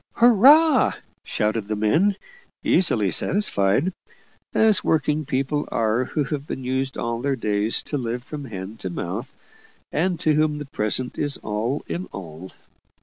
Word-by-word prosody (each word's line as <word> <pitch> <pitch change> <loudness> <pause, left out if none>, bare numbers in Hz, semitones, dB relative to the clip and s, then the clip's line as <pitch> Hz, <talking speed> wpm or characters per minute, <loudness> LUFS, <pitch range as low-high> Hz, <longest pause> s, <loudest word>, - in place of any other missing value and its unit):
"Hurrah!" 265 +6 +6 0.3
shouted 110 -1 -1
the 110 - -2
men, 160 - +2 0.5
easily 110 - +3
satisfied; 150 - +2 0.6
as 220 -2 +3
working 155 -1 +1
people 140 +2 -1
are, 115 +2 +1
who 150 +3 -1
have 145 +1 -4
been 135 - -5
used 130 +1 -2
all 115 0 -3
their 140 +1 0
days 105 -2 0
to 145 - -3
live 120 0 -3
from 145 +1 -7
hand 105 -1 -8
to 95 - -4
mouth, 85 - -5 0.6
and 175 +2 0
to 155 - +3
whom 150 0 +1
the 145 - -6
present 125 0 -2
is 145 -1 -1
all 110 +7 -2
in 180 +2 -4
all. 90 -1 -9
135 Hz, 145 wpm, -23 LUFS, 110-155 Hz, 0.6 s, Hurrah